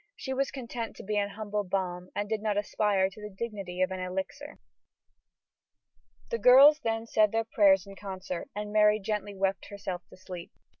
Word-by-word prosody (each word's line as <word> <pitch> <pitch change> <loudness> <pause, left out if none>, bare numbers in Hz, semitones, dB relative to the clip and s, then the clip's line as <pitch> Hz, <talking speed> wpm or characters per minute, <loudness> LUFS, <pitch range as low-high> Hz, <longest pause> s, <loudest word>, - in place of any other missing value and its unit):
She 265 - -4
was 275 +1 0
content 235 -3 -6
to - - -10
be 210 +2 -2
an 200 0 +1
humble 210 0 -3
balm 180 -1 -3
and 205 0 -1
did 220 0 -2
not 210 -1 0
aspire 205 -2 +1
to 195 +2 -12
the 210 - -6
dignity 195 -3 -3
of 185 - 0
an 185 - -4
elixir. 190 +11 -5 1.7
The 465 - -1
girls 275 +4 +8
then 225 -4 -2
said 215 -2 +3
their 225 0 +1
prayers 195 -4 +4
in 195 0 -11
concert 190 +2 -6
and 210 0 -4
Mary 210 0 +5
gently 205 0 -3
wept 195 -1 -1
herself 195 -3 -5
to - - -15
sleep. 180 -2 -9
205 Hz, 185 wpm, -29 LUFS, 190-220 Hz, 1.7 s, girls